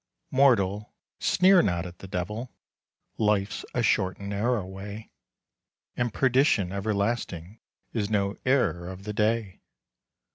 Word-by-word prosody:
Mortal, 105 -7 +2 0.2
sneer 185 0 +5
not 90 - 0
at 90 0 -10
the 95 - -9
devil; 105 +6 -4 0.7
Life's 105 -2 +1
a 120 - +1
short 95 -4 +2
and 100 0 -7
narrow 105 +1 0
way, 100 +3 -8 0.8
And 120 -1 -1
perdition 130 -6 +2
everlasting 100 -2 -2 0.3
Is 105 -3 -1
no 100 -2 0
error 125 -10 +1
of 95 +1 -9
the 105 +1 -4
day. 110 -2 0
105 Hz, 120 wpm, -27 LUFS, 95-115 Hz, 0.8 s, sneer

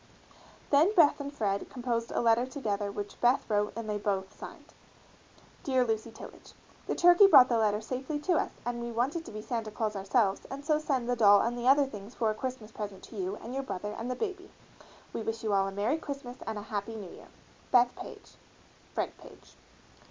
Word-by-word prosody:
Then 320 +9 +4
Beth 310 -6 +5
and 285 0 -5
Fred 200 -8 -2
composed 235 -2 -2
a - - -1
letter 235 +1 +3
together 210 -7 -3
which 205 0 -7
Beth 245 +3 +3
wrote 210 -1 +1
and 230 -1 -5
they 210 -1 -2
both 195 -1 -2
signed: - - -11 0.9
DEAR 260 -6 +2
LUCY 225 0 -2
TILLAGE: 225 - -12 0.3
The - - -1
turkey 355 +3 +7
brought 260 -9 +8
the 235 -2 +2
letter 210 -1 +1
safely 265 +6 -4
to 360 +4 +1
us - - 0 0.2
and 240 0 -3
we 235 0 -4
wanted 270 +8 -1
to - - -9
be 215 0 -7
Santa 230 -3 -3
Claus 215 0 -2
ourselves 195 +1 +1
and 280 +1 -7
so 305 -1 +2
send 270 -6 -1
the 245 - +1
doll 205 -3 +6
and 240 +1 -1
the 240 +1 -3
other 280 +2 +6
things 215 -2 -10
for 225 -2 +1
a - - -2
Christmas 230 -1 -6
present 205 -3 -7
to - - -12
you 190 0 -3
and 235 - -7
your 270 - -1
brother 210 -5 -5
and 230 +2 -5
the 250 - -1
baby. 385 - -4 0.6
We - - -3
wish 225 +1 -4
you 215 -2 0
all 195 0 +3
a - - -4
Merry 215 +10 0
Christmas 275 -5 -7
and 220 - -3
a 205 - -6
Happy 215 +1 -4
New 200 -5 -8
Year. - - -13 0.4
BETH 245 0 +4
PAGE, - - -11 0.6
FRED - - -2
PAGE. - - -16
235 Hz, 210 wpm, -30 LUFS, 210-265 Hz, 0.9 s, brought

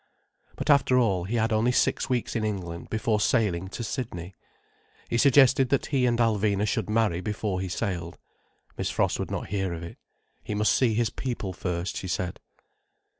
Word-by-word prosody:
But 150 - +1
after 140 -3 +4
all, 95 -8 +2
he 110 +6 -3
had 115 -1 +1
only 110 +3 +3
six - - +1
weeks 125 -2 -1
in 115 - 0
England, 90 -5 -4
before 110 -1 0
sailing 100 -5 +1
to 110 +5 -6
Sydney. 95 -7 -5 0.8
He 115 - +2
suggested 135 -1 +5
that 140 - +1
he 130 -4 +1
and 120 -1 +1
Alvina 105 -3 +2
should 110 -2 -1
marry 105 -6 +1
before 105 -2 -2
he 95 - -3
sailed. 90 -3 -3 0.6
Miss - - -1
Frost - - 0
would - - -3
not - - -4
hear 95 -2 -1
of 85 - -7
it. 85 - -9 0.4
He 105 - -4
must 105 0 +3
see 120 -4 +2
his 115 0 +1
people 120 -7 -4
first, 90 +1 -3
she 95 - -5
said. 90 0 -3
110 Hz, 180 wpm, -26 LUFS, 95-120 Hz, 0.8 s, suggested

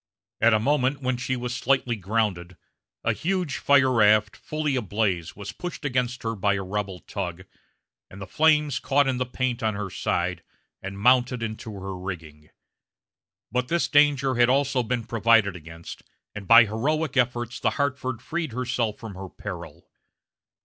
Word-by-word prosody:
At 115 0 +5
a - - +3
moment 135 +2 +1
when 130 -1 0
she 125 +1 -2
slightly 125 0 0
grounded 95 -4 -2 0.5
a - - +2
huge 180 -3 -2
fire 140 -2 +4
raft, 105 -2 +4
fully 155 -2 -2
ablaze, 100 -7 -1
was 105 0 -7
pushed 175 +6 -7
against 125 -2 -1
her 115 0 -1
by 100 0 +1
a 95 - -3
rebel 95 -1 -4
tug, 90 -3 -5 0.7
and 95 - -12
the 95 - -6
flames 150 +2 +2
caught 140 0 +2
in 130 -1 0
the 125 0 -2
paint 125 -1 -2
on 110 -3 0
her 100 -2 -4
side, 90 +1 -1 0.4
and 95 +1 -6
mounted 125 +2 +3
into 110 0 -5
her 95 0 -6
rigging. 80 -5 -8 1.0
But 125 +1 0
this 170 +3 +1
danger 145 -3 +3
had 120 0 +4
also 135 0 +2
been 120 0 -2
provided 115 -3 +3
against, 85 0 -10 0.3
and 105 -2 -8
by 115 0 +9
heroic 140 +8 -1
efforts 125 -1 0
the - - +2
Hartford 130 -4 -2
freed 160 -3 -3
herself 120 -3 -1
from 110 -3 -8
her 95 0 -8
peril. - - -9
115 Hz, 160 wpm, -25 LUFS, 100-130 Hz, 1.0 s, by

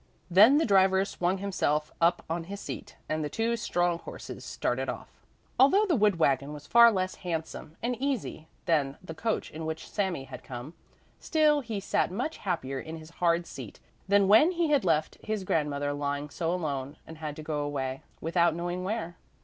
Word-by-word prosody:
Then 215 +10 +8
the 320 - +3
driver 190 -2 +4
swung 185 -1 -1
himself 155 -6 -1
up 170 +1 +3
on 165 +1 -3
his 200 +3 -7
seat 205 - -7
and 155 0 -1
the 150 - -2
two 225 +7 0
strong 175 -6 0
horses - - -9
started - - -2
off. - - -6 0.5
Although 385 +11 +6
the 355 -6 +2
wood 210 -6 +3
wagon 140 -2 +1
was 145 -1 -9
far 235 +6 +7
less 185 -2 -1
handsome 160 -2 -5
and 245 +1 0
easy 260 - -2 0.2
than 145 -5 +1
the 165 - -7
coach 220 +7 -2
in 160 +1 -6
which 160 0 -4
Sami 190 -9 -2
had 130 -1 -10
come, 125 +5 -8 0.5
still 305 -2 +3
he 225 -5 -4
sat 195 - 0
much 240 - -3
happier 135 -8 -3
in 160 +4 -7
his 160 0 -12
hard 170 0 +3
seat 130 -10 -9 0.3
than 200 0 +4
when 260 - +6
he 335 -3 +1
had 285 -6 +3
left 160 -3 +1
his 215 -2 -2
grandmother 145 -4 0
lying 145 0 -3
so 165 -1 -1
alone 145 -5 -3
and 160 -1 -11
had 150 -2 -5
to 155 - -8
go 150 -1 -2
away, 135 -2 -3 0.2
without 170 0 +2
knowing 175 +1 -3
where. 185 -4 -3
170 Hz, 190 wpm, -29 LUFS, 150-205 Hz, 0.5 s, Then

